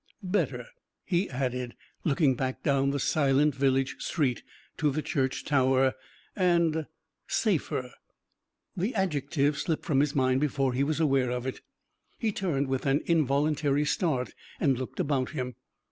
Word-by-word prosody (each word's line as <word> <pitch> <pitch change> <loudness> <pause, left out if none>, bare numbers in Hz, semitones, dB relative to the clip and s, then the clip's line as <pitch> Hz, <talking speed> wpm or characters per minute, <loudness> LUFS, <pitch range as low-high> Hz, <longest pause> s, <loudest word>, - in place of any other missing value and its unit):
Better," 165 - -1 0.4
he 180 +2 0
added, 125 -1 -3 0.3
looking 145 -2 +3
back 130 +1 -3
down 140 -1 +2
the 140 0 -1
silent 145 +1 +3
village 135 0 +1
street 135 -8 0 0.4
to 150 - +2
the 150 +2 -2
church 135 -4 -1
tower, 130 -2 +3 0.4
"and 170 -4 +2 0.4
safer." 155 - 0 0.8
The 200 +8 -2
adjective 145 -5 0
slipped 160 -3 -2
from 140 -4 +2
his 145 0 +1
mind 130 -1 +2
before 135 -3 +1
he 130 +3 +1
was 155 +2 -1
aware 135 -5 +2
of 125 0 -3
it. 130 - -4 0.6
He 225 -2 0
turned 155 -9 -1
with 130 +1 -1
an 135 +2 +3
involuntary 150 -1 +2
start 150 -6 0 0.3
and 135 -4 +3
looked 130 0 -6
about 135 -3 0
him. 125 -1 -3
140 Hz, 145 wpm, -28 LUFS, 130-155 Hz, 0.8 s, looking